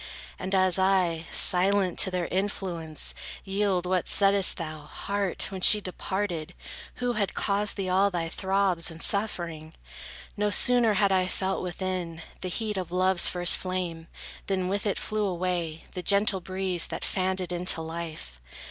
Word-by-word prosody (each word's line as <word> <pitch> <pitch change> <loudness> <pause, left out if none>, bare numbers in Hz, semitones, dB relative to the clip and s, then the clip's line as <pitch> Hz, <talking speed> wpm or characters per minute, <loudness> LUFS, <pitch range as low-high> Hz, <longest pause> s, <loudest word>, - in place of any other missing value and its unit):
And 190 +1 -2
as 185 -1 +2
I, 180 -4 +1
silent, 185 0 +2
to 190 - +5
their 180 -2 -2
influence 180 -5 -3 0.3
yield, 195 -2 -1
What 185 -1 -1
saidst 195 -1 +4
thou, 155 -2 -6
heart, 195 +6 -3
when 190 -1 -6
she 210 - +9
departed, 185 -3 -4 0.4
who 245 0 -2
Had 210 -3 -2
caused 205 +1 0
thee 195 -2 -3
all 190 +2 +2
thy 170 -3 -3
throbs, 190 -1 0
and 165 -1 -11
suffering? 170 -6 +1 0.6
No 210 -1 0
sooner 235 0 +4
had 200 0 +2
I 185 -1 +2
felt 190 +1 -2
within, 180 -2 -5 0.2
the 185 - -4
heat 210 +2 -3
Of 180 -2 -5
love's 185 0 +5
first 175 -1 +4
flame, 180 -3 -4 0.4
than 185 -2 -1
with 200 +2 -2
it 200 - -1
flew 215 -1 -2
away 175 -3 -3
The 180 - -5
gentle 200 0 +2
breeze, 185 -1 -2
that - - -5
fanned 190 0 -1
it 180 -2 -4
into 175 -1 -1
life. 160 - -7
185 Hz, 155 wpm, -26 LUFS, 175-200 Hz, 0.6 s, she